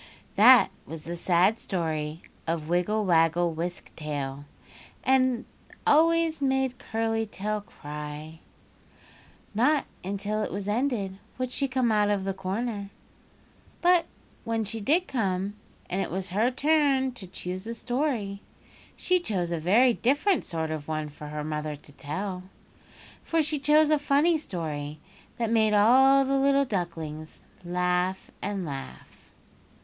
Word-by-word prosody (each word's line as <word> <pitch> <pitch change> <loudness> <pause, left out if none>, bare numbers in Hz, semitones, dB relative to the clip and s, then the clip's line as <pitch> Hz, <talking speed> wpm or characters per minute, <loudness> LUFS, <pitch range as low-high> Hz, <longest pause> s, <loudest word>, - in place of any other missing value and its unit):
That - - +7 0.2
was 160 0 -7
the 170 +1 -5
sad 180 +5 +3
story 160 -3 -3 0.2
of 160 -2 -2
Wiggle 180 +5 +1
Waggle 170 -1 +3
Wisk 175 +2 -5
Tail 145 -2 -4 0.6
that 255 -2 +3 0.4
always 325 0 +4
made 265 -2 +1
Curly 225 0 -1
Tail 210 +1 -3
cry. 150 -2 -8 1.1
Not 265 +7 +3 0.2
until 200 +3 -2
it - - -2
was 200 0 -4
ended 210 -4 -1 0.2
would 255 -1 -2
she 275 +1 0
come 255 -3 +1
out 210 -1 +3
of 205 -2 0
the 195 0 -1
corner, 200 +2 -3 0.9
but 350 -1 +4 0.4
when 225 -1 -1
she 220 +2 -4
did 325 - +2
come 195 -5 -1 0.3
and 190 +2 -1
it - - -2
was 190 +1 -3
her 215 +6 +2
turn 275 -1 +2
to 225 -7 -9
choose 185 +2 -6
a 230 - -4
story 240 -5 -2 0.6
she 365 0 +2
chose 185 - -2
a 170 - -1
very 225 +10 +4
different 290 - +2
sort 160 -2 -3
of 155 -2 -5
one 155 -1 -2
for 150 +1 -10
her 150 0 -4
mother 150 0 -3
to 145 0 -14
tell—for 185 - -5
she 300 0 0
chose 300 +2 +4
a 305 - +4
funny 290 +4 +3
story 155 - -4 0.4
that 230 -2 -1
made 220 -2 +3
all 265 +6 +6
the 275 +1 +1
little 275 0 +3
ducklings 165 - -5 0.2
laugh 180 +1 -1
and 195 -2 -3
laugh. 140 -3 -9
200 Hz, 140 wpm, -27 LUFS, 170-255 Hz, 1.1 s, That